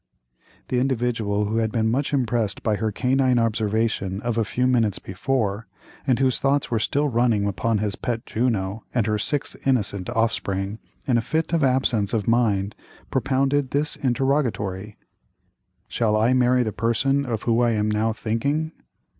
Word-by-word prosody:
The 125 - +1
Individual, 115 -5 0
who 110 +2 -1
had 110 -1 +1
been 110 -1 +1
much 135 +4 0
impressed 120 -7 0
by 110 -2 +1
her 110 0 -1
canine 130 +2 +2
observation 110 -3 0
of 120 -1 -2
a 115 - +2
few 125 +4 -1
minutes 115 -6 +2
before, 105 +1 -2 0.4
and 130 -3 +3
whose 130 -2 +3
thoughts 140 -1 +1
were 115 - +1
still 145 +7 +1
running 115 -5 +2
upon 100 +3 0
his 105 -1 -1
pet 115 -2 -3
Juno, 110 -3 -1
and 120 -4 +2
her 105 -1 0
six 145 +6 -2
innocent 105 -7 0
offspring, 110 -3 -1 0.3
in 120 -3 +2
a - - -1
fit 160 +7 -2
of 165 -3 +2
absence 125 -5 +2
of 105 -3 -1
mind 105 -4 +2 0.4
propounded 135 +1 +1
this 145 +3 0
interrogatory: 115 -7 -1 0.9
"Shall 110 -2 +1
I 115 +4 +3
marry 125 0 +3
the 110 - -2
person 125 +6 +1
of 115 -5 -3
whom 115 0 +2
I 120 -1 +3
am 105 -1 0
now 110 +2 +1
thinking?" 140 +9 -1
115 Hz, 165 wpm, -23 LUFS, 105-130 Hz, 0.9 s, and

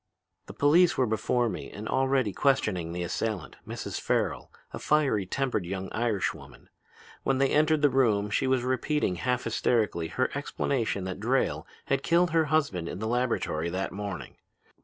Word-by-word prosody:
"The - - -10
police 170 +5 +4
were 130 - +3
before 115 +2 +1
me - - -5
and 105 +2 -7
already 130 -5 +1
questioning 105 - +1
the 90 +1 -3
assailant, 90 -2 -3
Mrs. - - -5
Farrel, - - -1 0.2
a - - -5
fiery 135 -11 +2
tempered 130 -2 -1
young 95 +2 -4
Irish 110 -4 0
woman. - - -14 0.5
When 135 -1 0
I 135 - +4
entered 155 +2 +2
the 145 - +6
room 105 -6 +2
she 130 - +1
was 130 -2 +2
repeating 130 - 0
half 125 +4 -1
hysterically 105 -8 0
her 130 +9 -1
explanation 130 -7 -1
that 95 0 -5
Drayle 125 +5 0 0.2
had 135 -1 0
killed 170 +4 +3
her 165 -1 +3
husband 140 - 0
in - - -5
the 110 - -4
laboratory 115 -9 0
that 95 +2 -3
morning. 100 -1 -6
120 Hz, 165 wpm, -28 LUFS, 100-135 Hz, 0.5 s, the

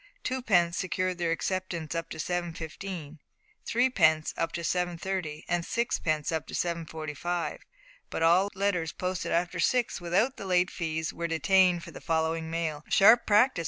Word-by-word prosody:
Twopence 200 -10 +2
secured 185 -1 -1
their 170 -1 0
acceptance 175 -2 -2
up 165 0 -3
to - - -7
7:15. 170 -1 -5 0.5
Threepence 175 -11 +3
up 165 - -1
to 170 - -3
7:30, 175 -2 -2
and 175 0 0
sixpence 160 -10 -1
up 160 -1 -2
to - - -6
7:45, 165 0 -3 0.5
but - - -2
all 180 +4 +5
letters 185 -5 0
posted 185 0 -3
after 175 +1 0
six 245 -7 +1
without 200 +10 +1
the 200 - -7
late 180 0 +2
fees 160 -2 -3
were 170 - -3
detained 175 +1 +3
for - - -9
the - - -10
following 160 0 0
mail. 160 -3 -2
"Sharp 225 +4 +6
practice!" 215 +1 +4
175 Hz, 150 wpm, -28 LUFS, 160-185 Hz, 0.5 s, Sharp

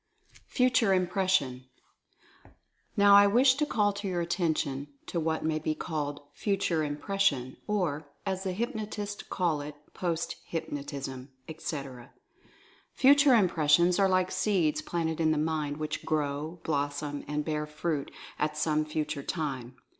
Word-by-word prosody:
FUTURE 250 -5 +3
IMPRESSION. 180 -8 +1 0.8
I - - -21 0.5
now 200 0 +7
wish 255 +5 +5
to 295 +3 -1
call 205 -6 +1
your 185 -4 -2
attention 160 -5 -1 0.2
to 170 - -2
what 160 0 -1
may 155 -1 +1
be 155 0 -1
called 145 -4 -3
"Future 190 -4 0
Impression," 145 - 0
or, 165 -8 -1 0.2
as 190 -1 -2
the 190 - -1
hypnotists 210 -1 -4
call 170 -5 -1
it, 145 0 -7 0.2
"post 170 -2 -2
hypnotism/' 140 -4 -5 0.2
etc. 140 -6 -6 0.8
Future 280 0 +6
Impressions 175 -2 +4
are 195 -1 +4
like 185 0 +2
seeds 160 -8 +1
planted 160 0 -2
in 160 - +3
the 155 - +2
mind, 150 -1 -1
which 155 0 -4
grow, 155 +2 -2
blossom 145 -1 -2
and 150 0 -2
bear 150 -1 -2
fruit 150 -1 -2 0.3
at 150 0 -1
some 155 0 +1
future 150 -1 -3
time. 135 -6 -4
160 Hz, 130 wpm, -29 LUFS, 150-190 Hz, 0.8 s, now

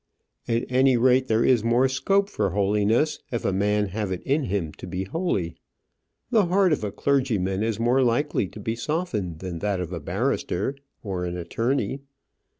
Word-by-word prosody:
"At 115 0 0
any 130 0 +4
rate, 130 +2 +4
there 115 0 +2
is 120 -4 +4
more 120 +3 +3
scope 195 +10 +1
for 200 - -1
holiness 105 - +1
if 120 - -3
a 95 - +1
man 105 +1 +1
have 105 0 -3
it 90 - -4
in 140 +1 +1
him 90 -5 -2
to - - -7
be 90 +1 -3
holy. 95 - -2 0.8
The 210 -5 +4
heart 185 -1 +3
of 145 - -2
a 105 - -2
clergyman 110 -10 0
is 110 -1 -1
more 120 +3 +3
likely 120 -3 +1
to 105 - -11
be 110 +2 -2
softened 115 - -3
than 90 -3 -5
that 100 -1 -1
of 90 0 -4
a 85 - -3
barrister 95 - -1 0.3
or 95 -4 -3
an 90 0 -4
attorney." 120 +10 -1
110 Hz, 180 wpm, -25 LUFS, 95-130 Hz, 0.8 s, any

